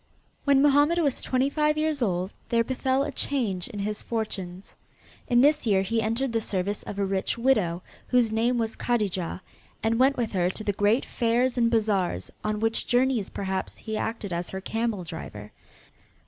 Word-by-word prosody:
When 280 -1 +5
Mohammed 290 +3 +4
was 290 -6 +1
twenty 260 +1 +1
five 300 +1 +1
years 305 -2 0
old 185 -3 0 0.2
there 230 -1 +3
befell 260 +2 0
a 290 - -3
change 225 -10 -1
in 205 - -8
his 210 +1 -2
fortunes. 195 -5 -5 0.5
In 240 -2 +4
this 295 -1 +3
year 195 -2 +3
he 225 +3 0
entered 230 +3 -1
the 225 - +1
service 200 0 -2
of 200 - -7
a 200 - +1
rich 195 +2 -1
widow, 210 -9 +1 0.2
whose 245 -3 +3
name 235 +3 +1
was 225 -1 -1
Kadijah, 195 -7 -1 0.4
and 225 +1 +1
went 270 +2 +4
with 235 -3 -1
her 180 -2 +1
to 215 - -6
the 205 - 0
great 205 +6 +2
fairs 240 +1 +1
and 235 -2 +3
bazaars 200 - 0
on 215 0 -1
which 225 +1 0
journeys, 245 -4 +2
perhaps, 190 -1 -3
he 220 -1 -5
acted 215 -3 -3
as 175 +1 -3
her 190 - -5
camel 220 -1 -2
driver. 105 -11 -8
225 Hz, 180 wpm, -26 LUFS, 195-255 Hz, 0.5 s, When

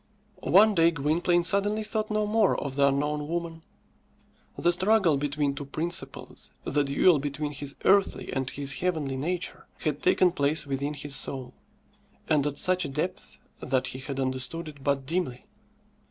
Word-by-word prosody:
One 210 +3 +6
day 165 -3 +4
Gwynplaine 170 +3 +1
suddenly 205 +4 +2
thought 215 0 -2
no 215 0 0
more 215 +1 +2
of 140 -2 -4
the 140 0 +4
unknown 145 +2 -1
woman. 165 0 -4 1.0
The 175 - +2
struggle 185 -2 +3
between 145 0 -1
two 140 +1 -7
principles 165 +5 -4
the 145 - +1
duel 145 +4 +3
between 145 +1 -3
his 145 -1 -5
earthly 195 0 +2
and 130 -1 -2
his 140 -1 -1
heavenly 160 -7 -1
nature 175 +7 -3
had 150 -2 -2
taken 185 0 +3
place 150 -1 +1
within 140 +2 -3
his 145 0 -3
soul, 130 -2 -4 0.7
and 150 -2 +2
at 145 -1 -4
such 185 +2 +3
a - - -4
depth 135 - -4 0.2
that 130 0 -1
he 130 - -5
had 135 0 -5
understood 130 +5 0
it 145 -3 -11
but 140 -1 0
dimly. 155 -5 -2
150 Hz, 160 wpm, -27 LUFS, 140-175 Hz, 1.0 s, One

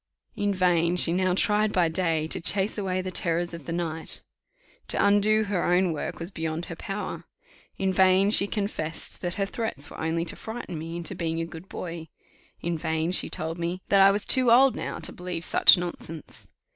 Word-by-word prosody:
In 205 0 0
vain 175 -2 +2
she 170 -1 +4
now 185 0 +1
tried 210 +2 +1
by 180 -4 +2
day 160 -2 0
to - - -1
chase 195 +4 +2
away 185 -3 -2
the 185 - -4
terrors 175 -2 0
of 165 -4 -9
the - - -3
night: 165 -2 -3 0.6
to - - -2
undo 205 +2 +3
her 200 -4 -1
own 180 -1 +2
work 150 - -5
was 170 +3 -1
beyond 160 0 -4
her 165 - -7
power. 200 +3 -6 0.5
In 190 -1 0
vain 190 +2 +4
she 200 -2 +6
confessed 200 -7 -3
that 175 -1 -3
her 195 - 0
threats 195 - -4
were - - -10
only 165 +1 -1
to 160 - -5
frighten 220 -7 -7
me 165 +2 -6
into 170 +2 -3
being 165 -2 -3
a 165 - -2
good 165 +3 -11
boy. 165 -2 -7 0.5
In 170 -1 -2
vain 160 +2 -1
she 185 - +2
told 160 +2 -3
me 175 +2 -3
that 200 -1 +5
I 195 - +8
was 205 +1 0
too 255 -3 +5
old 260 +2 +6
now - - -5
to - - -5
believe 180 -2 -5
such - - +6
nonsense. 170 -3 -7
180 Hz, 200 wpm, -26 LUFS, 165-195 Hz, 0.6 s, I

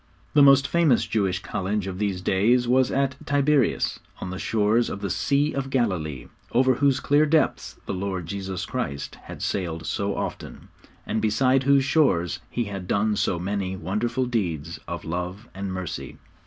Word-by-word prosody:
The 145 - +6
most 140 0 +7
famous 165 -8 +3
Jewish 95 -4 0
college 100 0 -2
of 95 -1 -5
these 100 -3 -1
days 115 +7 +2
was 130 +1 +3
at 135 -1 0
Tiberius, 145 -2 +2 0.2
on 90 - -5
the 95 - -5
shores 110 +2 +2
of 100 - -5
the 100 -3 -2
'Sea 140 - +1
of 135 -1 -3
Galilee,' 90 - -1 0.3
over 130 +2 +4
whose 140 +1 +2
clear 145 +2 +3
depths 155 +1 +1
the - - -3
Lord 95 -2 -3
Jesus 95 0 -4
Christ 70 0 -4
had - - -8
sailed 85 -4 -2
so 100 +5 -1
often, - - -6 0.4
and 110 +1 -1
beside 130 +5 +2
whose 140 -1 +4
shores 95 - +2
He 120 - -1
had 100 -4 -6
done 105 +2 +1
so 95 -3 0
many 95 +1 -2
wonderful 115 +7 -1
deeds 85 - -2
of 85 -1 -5
love 90 +6 -4
and 95 0 -4
mercy. 95 -3 -5
105 Hz, 170 wpm, -25 LUFS, 95-130 Hz, 0.4 s, most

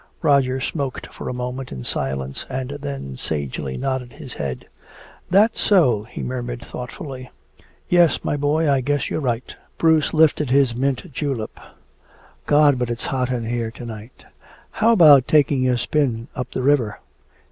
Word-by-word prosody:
Roger 135 -2 +3
smoked 140 -1 -3
for - - -6
a - - -2
moment 125 +1 -5
in 65 - -6
silence 65 +1 -3
and 130 0 -4
then 140 - -5
sagely 70 -1 -3
nodded 130 -2 -3
his 130 - -9
head. 65 -3 -5 0.6
"That's 210 +4 +4
so," 130 - +3
he - - -6
murmured 120 -1 -4
thoughtfully. 130 0 -7 0.6
"Yes, 175 -2 +3
my - - -1
boy, 150 +2 +1
I 140 -2 +3
guess 145 -1 -1
you're - - -1
right." 120 -3 -2 0.2
Bruce 160 -2 +3
lifted 155 -3 +3
his 135 -2 +3
mint 135 +5 -2
julep: 125 -5 -3 0.9
"God, 145 -3 +5
but 125 -1 -1
it's 120 0 -3
hot 130 -1 0
in 120 -3 -2
here 115 0 -2
to 120 +1 -10
night. 110 +1 -10 0.5
How 230 - +3
about 150 - +7
taking 140 -4 +3
a 125 - +2
spin 120 -2 -1
up 125 - -4
the 130 - -3
river?" 130 -6 +2
130 Hz, 160 wpm, -21 LUFS, 120-145 Hz, 0.9 s, about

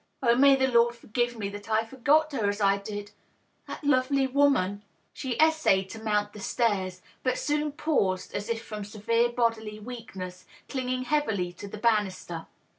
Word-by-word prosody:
" - - -20
Oh, 235 -2 +5
may 275 +2 +7
the 265 0 +2
Lord 235 -2 +3
forgive 240 +1 -2
me 205 -2 -2
that 205 +2 -9
I 220 +1 +2
forgot 290 +6 +2
her 225 -7 0
as 205 +1 -3
I 200 -1 +3
did! 205 0 -6 0.6
That - - -7
lovely 270 -1 +3
woman 260 -8 +2 0.2
!" - - -43
She 260 -4 -4
essayed 310 -12 +3
to 225 - -8
mount 210 -1 0
the 210 - -10
stairs, 195 -5 -1 0.2
but 255 - 0
soon 300 0 0
paused, 275 - 0
as 205 +2 -4
if 230 0 -2
from 210 -1 -6
severe 225 +3 +1
bodily 230 -3 -1
weakness, 200 -6 -8 0.2
clinging 255 -1 -2
heavily 220 -11 0
to 200 - -9
the 200 - -8
banister. 200 -6 0
225 Hz, 180 wpm, -27 LUFS, 205-260 Hz, 0.6 s, may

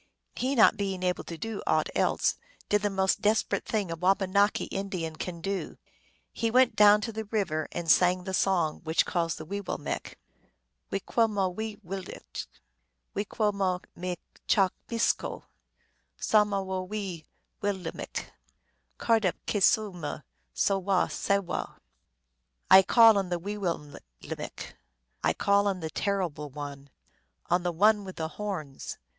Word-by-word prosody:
He, 265 +3 0
not 220 -2 +6
being 195 -2 -2
able 180 0 0
to 165 - -7
do 220 +5 -4
aught 155 0 +2
else, - - +2 0.3
did 210 0 +3
the 205 - +1
most 190 -1 +1
desperate 215 +1 +1
thing 205 -6 -1
a - - -2
Wabanaki 195 +3 +2
Indian 185 -5 -4
can 170 0 -6
do. 195 +2 -3 0.6
He 230 - 0
went 255 +1 +4
down 210 0 +7
to 225 - -3
the 220 0 -4
river, 190 -8 -1
and 170 - -4
sang 180 0 +4
the 190 - -5
song 175 -5 +1
which 160 0 +2
calls 165 -2 -1
the 155 - -8
Weewillmekq\ 200 +3 -4 0.4
" - - -51
We 195 - -2
que 230 +3 +2
moh 200 -3 0
wee 215 +3 -5
will 195 +2 -4
1 - - -12
mick, - - -8 0.7
We 205 - -2
que 210 0 0
moh 190 -3 0 0.2
m 180 0 -3 0.3
cha 195 -2 +4 0.2
micso, 230 -1 0 0.7
Som 210 -1 +3
awo 190 -2 -2
wee 195 -5 -4 0.4
will 205 -1 +1
1 185 - -11
mick! - - -5 0.7
Cardup 220 -6 +2
ke 205 - -1
su 210 0 +4
m 155 -3 -5 0.3
so 195 -1 +1
wo 190 -1 +2
Sawo! 200 -3 -1 0.5
" - - -35
I 190 - +11
call 225 +1 +6
on 190 -2 -3
the 175 - 0
Wee 200 +5 -5
will 175 -4 0
1 145 -1 -12 0.2
mick! - - -7 0.5
1 80 0 +2
call 200 0 +3
on 195 -2 0
the 160 -2 -5
Terrible 175 -6 -2
One! 140 0 -8 0.6
On 175 +1 +4
the 175 0 -1
One 205 +5 +4
with 190 -1 -8
the 160 -1 -3
Horns 170 -9 -5
190 Hz, 165 wpm, -28 LUFS, 170-205 Hz, 0.7 s, I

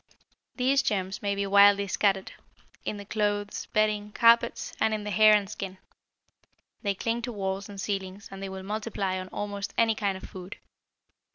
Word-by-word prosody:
These 270 +2 +3
germs 195 -6 -2
may 200 -1 0
be 200 0 -1
widely 200 0 +6
scattered, 195 0 +1 0.5
in 210 - -3
the 200 - -8
clothes, 205 -1 -1
bedding, 210 -1 +1
carpets, 235 0 +4
and 220 - +2
in 210 - -5
the 210 - -4
hair 215 +1 +7
and 205 -1 +1
skin. 190 -2 -6 1.0
They 200 -3 0
cling 230 +4 -1
to 245 +1 -4
walls 195 -2 -3
and 200 -1 -9
ceilings 195 0 -4
and 195 0 -8
they 195 - -4
will 190 0 -7
multiply 205 -2 -2
on 185 - -6
almost 200 +1 -5
any 225 -1 +4
kind 200 -3 -1
of - - -13
food. 185 +1 -9
205 Hz, 175 wpm, -28 LUFS, 195-215 Hz, 1.0 s, hair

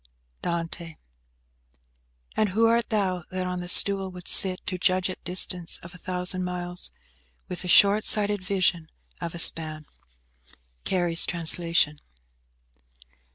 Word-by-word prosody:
DANTE. 170 -1 -6 1.4
"And 215 -1 0
who 220 +5 +1
art 230 0 0
thou, 190 -5 -2
that 185 0 -5
on 180 0 -5
the 175 0 -8
stool 195 0 +6
wouldst 180 -1 +1
sit 185 -1 +6
To 185 -3 -5
judge 185 0 0
at - - -12
distance 180 -1 0
of 170 +1 -12
a 180 - -15
thousand 185 0 -3
miles, 180 0 -5 0.6
With 180 -1 -6
the 180 - -7
short 200 +4 +4
sighted 205 -2 +2
vision 180 -4 -2 0.3
of 170 -1 -6
a - - -7
span?" 155 -2 +2 1.0
CARY'S 175 -3 +2
Translation. 165 -3 -1
180 Hz, 130 wpm, -24 LUFS, 170-190 Hz, 1.4 s, stool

